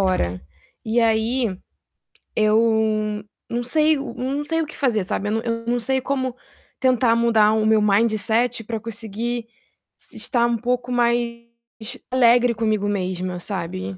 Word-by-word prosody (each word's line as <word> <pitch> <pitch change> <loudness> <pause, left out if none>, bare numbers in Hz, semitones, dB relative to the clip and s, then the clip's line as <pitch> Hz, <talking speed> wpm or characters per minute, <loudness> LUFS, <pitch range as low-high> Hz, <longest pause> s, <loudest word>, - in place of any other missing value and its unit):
hora. 90 - 0 0.4
E 225 +2 0
aí, 225 0 +1 0.8
eu 215 -1 +2 0.3
não 240 +1 -2
sei 310 +4 +3
o 275 - -5
hum, 260 +4 -3
não 295 - -2
sei 325 +1 0
o - - -1
que - - -11
fazer, 230 -8 +1
sabe, 205 +2 -2
eu - - -1
num 225 - +1
eu 230 0 -3
não 245 0 +1
sei 265 +3 0
como 260 -2 -2 0.4
tentar 250 -3 +3
mudar 225 -2 +4
o 220 -1 +1
meu 220 -1 +4
mindset 220 +3 +2
pra 225 0 -3
conseguir 230 +1 -4 0.5
se - - -12
estar 235 -2 +1
um 235 -1 +1
pouco 245 +2 -2
mais 235 -1 0 0.7
alegre 245 -1 +4
comigo 215 -2 0
mesma, 185 -2 -2
sabe? 165 - -5
230 Hz, 155 wpm, -22 LUFS, 215-245 Hz, 0.8 s, mudar